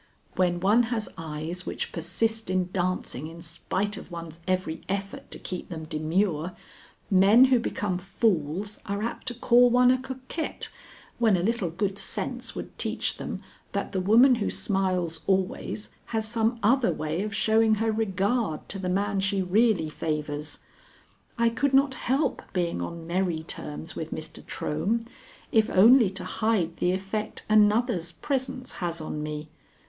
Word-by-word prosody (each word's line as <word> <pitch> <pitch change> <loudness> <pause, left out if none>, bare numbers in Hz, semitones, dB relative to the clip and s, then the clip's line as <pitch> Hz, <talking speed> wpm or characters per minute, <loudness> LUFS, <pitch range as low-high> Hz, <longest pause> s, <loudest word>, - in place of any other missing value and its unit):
When 175 -1 +2
one 205 +6 +4
has 225 -3 -1
eyes 160 +3 -5
which - - -3
persist 220 +6 -1
in 185 -1 0
dancing 180 -6 -2
in 165 +1 -10
spite 190 +5 -2
of - - -10
one's 165 -1 -7
every 185 -3 -1
effort 195 0 -4
to - - -6
keep 180 - -6
them 160 -3 -6
demure, 160 +2 0 0.6
men 200 +6 +7
who 250 - +5
become 200 -5 -2
fools 195 -1 -1
are 200 +1 -2
apt 235 - -4
to 245 - -2
call 245 +1 +5
one 250 +1 +5
a 255 - +2
coquette, 260 +5 -5 0.5
when 220 -5 +4
a 175 - -1
little 215 -4 0
good 195 +3 -2
sense - - -2
would - - -7
teach - - -1
them - - -5 0.3
that - - -2
the 190 - -1
woman 235 +8 +6
who - - +1
smiles 185 -4 0
always 190 +2 -1
has 220 -1 -1
some 225 +1 +1
other 245 +3 +4
way 155 +3 -2
of 205 -1 -3
showing 220 0 +4
her 225 +1 +1
regard 205 -3 0
to 195 - -3
the 185 -1 -2
man 200 +2 0
she 195 0 +1
really 195 -2 +3
favors. 150 -1 -3 0.8
I 235 0 +4
could 275 +4 +1
not 275 0 +4
help 265 +3 0
being 175 - 0
on 165 - -5
merry 170 -2 0
terms 160 0 -6
with 160 - -4
Mr. 155 0 -6
Trohm, 195 +10 -1 0.5
if 220 -1 +4
only 225 +3 +7
to 190 -1 -6
hide 185 -3 0
the 180 - +2
effect 195 +3 -3
another's 215 -4 +3
presence 260 - -3
has 170 -1 -2
on 155 -1 -4
me. 150 0 -5
195 Hz, 160 wpm, -27 LUFS, 170-225 Hz, 0.8 s, men